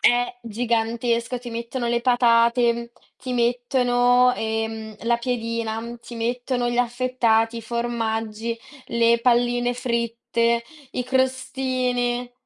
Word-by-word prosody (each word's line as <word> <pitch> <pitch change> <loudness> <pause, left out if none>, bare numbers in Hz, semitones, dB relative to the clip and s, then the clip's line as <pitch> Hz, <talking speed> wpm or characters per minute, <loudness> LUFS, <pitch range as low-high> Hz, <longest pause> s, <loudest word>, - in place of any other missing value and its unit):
È 245 0 +3
gigantesco. 235 +1 -1
Ti 245 - -8
mettono 235 +1 -3
le 235 0 +1
patate, 235 -1 +3 0.2
ti 255 -1 -6
mettono, 245 +1 +3
ehm, 220 -1 -3
la 235 +1 +2
piadina, 230 -1 -3
ti 240 - -10
mettono 245 +1 -1
gli 240 - -1
affettati, 240 -2 +1
i 230 - -8
formaggi, 225 -1 -2 0.3
le 235 0 +3
palline 245 0 +2
fritte, 235 -1 0 0.3
i 250 - -1
crostini. 255 -1 0
235 Hz, 105 wpm, -23 LUFS, 230-245 Hz, 0.3 s, È